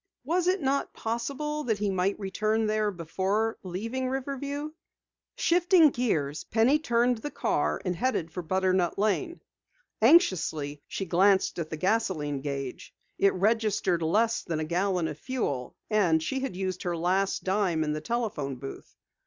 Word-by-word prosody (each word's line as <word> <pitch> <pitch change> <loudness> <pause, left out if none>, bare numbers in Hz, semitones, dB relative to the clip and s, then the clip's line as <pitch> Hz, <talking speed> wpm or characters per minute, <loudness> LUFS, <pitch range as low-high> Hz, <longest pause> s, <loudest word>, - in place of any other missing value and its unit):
Was 345 +6 0
it 365 -3 +1
not 275 +1 0
possible 280 +7 -3
that 220 -4 +1
he 205 -1 0
might 190 +1 0
return 215 +3 0
there 215 0 +1
before 195 +5 -1
leaving 230 +8 -3
Riverview? 280 +3 -3 0.6
Shifting 350 - +4
gears, 155 - -1
Penny 230 +7 +3
turned 240 -4 +1
the 295 - -4
car 75 - 0
and 180 - 0
headed 175 -7 -1
for 180 - -4
Butternut 185 0 +1
Lane. 275 - 0 0.6
Anxiously, 170 - +3
she 195 - -4
glanced 190 +2 +3
at 160 -2 -3
the 155 - -4
gasoline 160 -8 0
gauge. 135 -2 -5 0.2
It 195 - +4
registered 205 -3 +1
less 220 +8 +2
than 160 -2 -3
a 155 - -2
gallon 180 +1 0
of 150 - -6
fuel 145 - -3
and 175 -7 +2
she 265 +11 -2
had 265 -7 -4
used 185 -1 -3
her 175 -1 -2
last 190 +4 0
dime 190 -4 +1
in 150 -1 -1
the 155 - -4
telephone 165 - -2
booth. 135 +2 -9
200 Hz, 155 wpm, -28 LUFS, 170-245 Hz, 0.6 s, Shifting